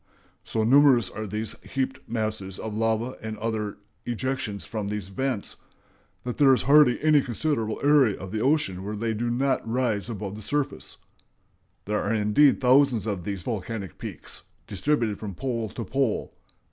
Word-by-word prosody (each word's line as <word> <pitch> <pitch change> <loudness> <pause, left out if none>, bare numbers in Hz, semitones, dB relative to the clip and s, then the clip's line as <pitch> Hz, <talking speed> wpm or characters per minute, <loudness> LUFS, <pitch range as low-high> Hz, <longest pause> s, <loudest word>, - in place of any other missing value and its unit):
So 110 - -1
numerous 130 -2 +5
are 110 0 -5
these 105 +3 -3
heaped 130 0 -3
masses 110 -4 -3
of 110 - -5
lava 115 +3 0
and 110 0 -5
other 110 -1 -3 0.3
ejections 120 -4 -3
from 105 -3 -4
these 105 -2 -4
vents 125 +1 -3 0.7
that 125 -1 -4
there 140 -2 +7
is - - -2
hardly 140 -2 +6
any 155 -2 +5
considerable 120 -3 -2
area 140 -8 +4
of 95 0 -7
the 110 0 -2
oceans 130 -9 +1
where 100 +3 -5
they 110 +2 -1
do 120 +2 -2
not 130 +3 +1
rise 115 -4 0
above 100 -3 -5
the 105 - -8
surface. 145 +6 -3 0.9
There 105 +1 0
are 100 - -1
indeed 110 +7 +4
thousands 130 -4 +4
of 100 -6 -3
these 100 -3 -4
volcanic 105 -5 -4
peaks - - -5 0.2
distributed 110 - 0
from 100 -4 -6
pole 115 -3 -2
to 115 +3 -6
pole.... 135 -5 -1
115 Hz, 160 wpm, -26 LUFS, 105-130 Hz, 0.9 s, there